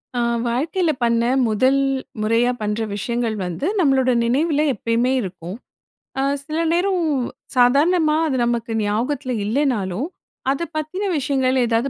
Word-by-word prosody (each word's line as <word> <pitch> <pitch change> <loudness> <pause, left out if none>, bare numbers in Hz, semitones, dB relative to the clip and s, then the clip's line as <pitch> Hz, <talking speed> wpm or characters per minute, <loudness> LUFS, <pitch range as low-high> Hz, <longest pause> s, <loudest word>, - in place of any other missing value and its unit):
ஆ - - 0 0.3
வாழ்க்கையில 315 +8 0
பண்ண 235 0 +2 0.3
முதல் 260 +6 +2 0.4
முறையா 230 +3 +2
பண்ற 210 +1 -1
விஷயங்கள் 235 +2 -2
வந்து 180 - -4
நம்மளோட 265 -6 +3
நினைவுல 295 +5 +1
எப்பயுமே 230 +3 0
இருக்கும். 180 -2 -7 0.6
அ - - +2 0.2
சில 310 +2 -3
நேரம் 360 0 +1 0.5
சாதாரணமா 305 +6 +4
அது 265 - -1
நமக்கு 235 -1 -2
ஞாபகத்துல 250 +6 -1
இல்லேனாலும், 230 - 0 0.4
அத 275 - -1 0.2
பத்தின 310 +6 -3
விஷயங்கள் 265 -2 +1
ஏதாவது 235 +3 0
255 Hz, 120 wpm, -21 LUFS, 230-295 Hz, 0.6 s, சாதாரணமா